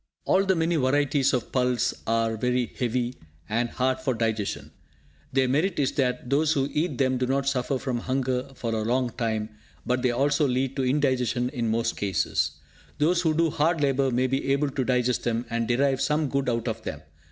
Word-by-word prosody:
All 195 +1 +3
the 190 -1 +3
many 165 0 +1
varieties 140 0 +2
of 125 -4 -2
pulse 125 -2 +1
are 115 0 +1
very 125 +2 0
heavy, 125 0 -1 0.3
and 120 +2 0
hard 130 +1 0
of 130 -3 +1
digestion. 110 -3 -2 0.6
Their 135 -1 +2
merit 160 +8 +1
is 135 -2 +1
that 125 -2 -1
those 150 +4 +2
who 140 -2 0
eat 150 -3 -1
them 130 -2 +1
do 125 - 0
not 135 +1 0
suffer 135 0 0
from 125 -2 -2
hunger 130 +1 -1
for 115 -2 -3
a 110 - 0
long 120 +2 0
time; 110 -2 -2 0.4
but 125 0 0
they 125 - +2
also 140 +4 +2
lead 130 +1 -1
to 135 - +1
indigestion 130 -2 +1
in 120 -4 -2
most 115 +1 0
cases. 95 -5 0 0.4
Those 170 +4 +2
who 160 -3 +1
do 165 -1 +2
hard 160 +3 +1
labour 135 -1 +2
may 125 +1 +1
be 135 +1 0
able 140 0 0
to 130 -1 -1
digest 125 -1 +1
them, 120 0 -1
and 115 -1 -1
derive 135 +2 +2
some 150 -1 +1
good 140 -1 0
out 115 0 -1
of 110 -1 -3
them. 80 -8 -6
130 Hz, 195 wpm, -26 LUFS, 120-140 Hz, 0.6 s, All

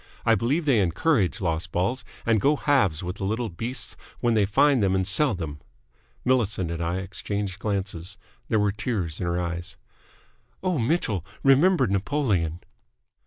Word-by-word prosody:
I 115 - +5
believe 130 - +1
they 130 -7 +4
encourage 100 - +1
lost 85 -2 -1
balls, 100 +8 -1 0.2
and 115 -3 +3
go 145 +2 +4
halves 130 - +2
with 90 +1 -4
the - - -5
little 110 +4 -1
beasts 115 +9 -3 0.2
when 120 -1 +2
they 105 -3 +3
find 135 +5 +4
them 95 -1 +2
and 95 -1 +1
sell 110 +6 +4
them!" 75 -5 -6 0.6
Millicent 110 -9 +1
and 85 0 -4
I 85 +1 -1
exchanged 95 +1 -4
glances. 95 -2 -3 0.3
There 110 - +1
were 105 -1 +2
tears 100 -6 -3
in 90 - -2
her 85 +1 0
eyes. 85 0 -4 0.9
"Oh, 180 -6 0
Mitchell! 115 - 0 0.2
Remember 140 +3 +5
Napoleon!" 100 - 0
100 Hz, 160 wpm, -25 LUFS, 90-125 Hz, 0.9 s, I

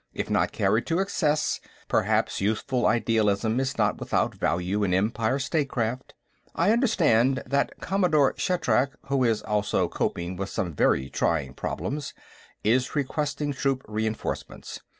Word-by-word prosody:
If - - -3
not - - +2
carried 115 - +1
to 165 - +1
excess, 155 -6 +1 0.3
perhaps - - +1
youthful 110 +4 0
idealism 110 0 +2
is 130 -1 -2
not - - +1
without - - 0
value 90 +4 -1
in 90 -2 +2
Empire 110 +5 +1
statecraft. 135 -4 -2 0.4
I 175 +5 +3
understand 155 - +3
that 140 +2 -1
Commodore 175 -8 +2
Shatrak, 135 -7 +1 0.2
who 135 -2 +2
is 115 -3 +1
also 105 -1 0
coping 90 +1 -3
with 95 +1 -3
some 90 -6 -3
very 65 -1 +2
trying 70 -3 -1
problems, 145 - -4 0.5
is 125 +6 +1
requesting 145 0 -1
troop 135 0 -1
reenforcements. 110 +1 -4
125 Hz, 130 wpm, -26 LUFS, 105-145 Hz, 0.5 s, I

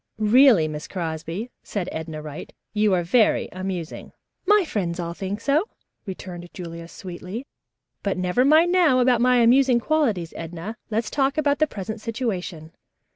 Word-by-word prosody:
"Really, 220 - +5
Miss 150 0 -6
Crosby," 170 +5 -4
said 195 -4 -4
Edna 160 -1 -6
Wright, 150 -1 -8 0.2
"you 210 -1 +2
are 175 - 0
very 215 +6 +3
amusing." 185 -3 -5 0.3
"My 415 -2 +5
friends 180 - -2
all 170 -1 -3
think 195 +3 -4
so," 295 - +1 0.4
returned 180 -2 -7
Julia 170 -2 -7
sweetly, 185 +7 -8 0.6
"but 200 -2 -1
never 180 +7 +1
mind 315 +5 +5
now 340 -8 +4
about 245 -2 +3
my 250 0 +4
amusing 245 +1 +5
qualities, 230 - 0
Edna. 170 +6 -6
Let's 220 0 -1
talk 275 +1 +1
about 290 -2 +2
the 310 - +3
present 215 -1 -6
situation." 195 -9 -4
210 Hz, 150 wpm, -23 LUFS, 175-255 Hz, 0.6 s, Really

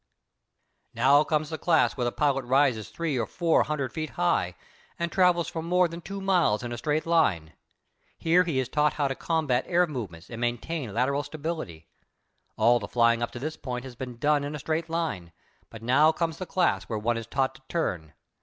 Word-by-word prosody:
Now 135 +5 +5
comes 155 0 -1
the 160 - -4
class 160 -3 +3
where 125 - -1
the 120 - 0
pilot 140 -1 +1
rises 130 -4 +2
three 160 -6 -2
or 115 - -1
four 170 - +2
hundred 140 -5 -2
feet 155 -1 -3
high 90 - +1 0.4
and 170 0 -2
travels 180 -2 +3
for 165 - -4
more 180 +2 +2
than 170 +1 -8
two 195 +4 -6
miles 180 - +2
in 120 - -5
a 120 - -4
straight 150 +3 -1
line. 100 - +1 0.6
Here 170 +2 +3
he 165 -6 -2
is 130 -2 0
taught 150 +2 +1
how 145 -2 0
to - - -1
combat 155 -7 0
air 180 0 +3
movements 105 - -7
and 115 0 -6
maintain 120 +2 -2
lateral 130 +6 +1
stability. 145 - -6 0.7
All 120 +2 +4
the - - -6
flying 115 -1 +3
up 120 - -1
to 120 - -6
this 155 +4 -4
point 125 -1 -5
has 130 - -8
been 125 -1 -7
done 145 +3 +2
in 145 +1 -4
a - - -5
straight 160 +3 -2
line, 155 - -3 0.4
but 115 -1 -11
now 140 +6 +5
comes 165 -1 -2
the 185 - -5
class 185 - +1
where 110 - -3
one 115 +3 0
is 115 -1 -5
taught 135 +1 0
to - - -17
turn. 90 - -2
145 Hz, 205 wpm, -27 LUFS, 120-165 Hz, 0.7 s, Now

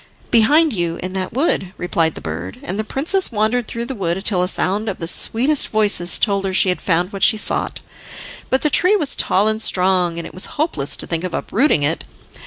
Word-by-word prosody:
"Behind 290 +7 +4
you, 170 -4 -2
in 185 0 -5
that 190 -1 -4
wood," 230 - -1
replied 165 -3 -1
the - - -8
bird, 85 +4 -6
and 190 +4 -5
the - - -1
princess 315 - +1
wandered 220 +2 -1
through 235 0 -4
the 265 - -5
wood, 190 -3 -3
till 185 -4 0
a 180 - 0
sound 205 +3 0
of 195 - -5
the 165 - -6
sweetest 260 - +3
voices 205 -5 +3
told 200 -2 0
her 190 -1 -3
she 190 - +3
had 180 - -2
found 180 +2 -1
what 195 - -7
she 220 - +4
sought. - - -1 0.7
But 260 - 0
the 300 - +1
tree 365 +8 +4
was 300 -9 -3
tall 200 +3 +1
and 220 0 0
strong, 180 -4 +1
and 170 - -5
it - - -10
was 185 - -2
hopeless 285 - +1
to - - -6
think 165 0 -3
of 185 - -4
uprooting 230 - +1
it. 155 +3 0
195 Hz, 220 wpm, -18 LUFS, 180-235 Hz, 0.7 s, Behind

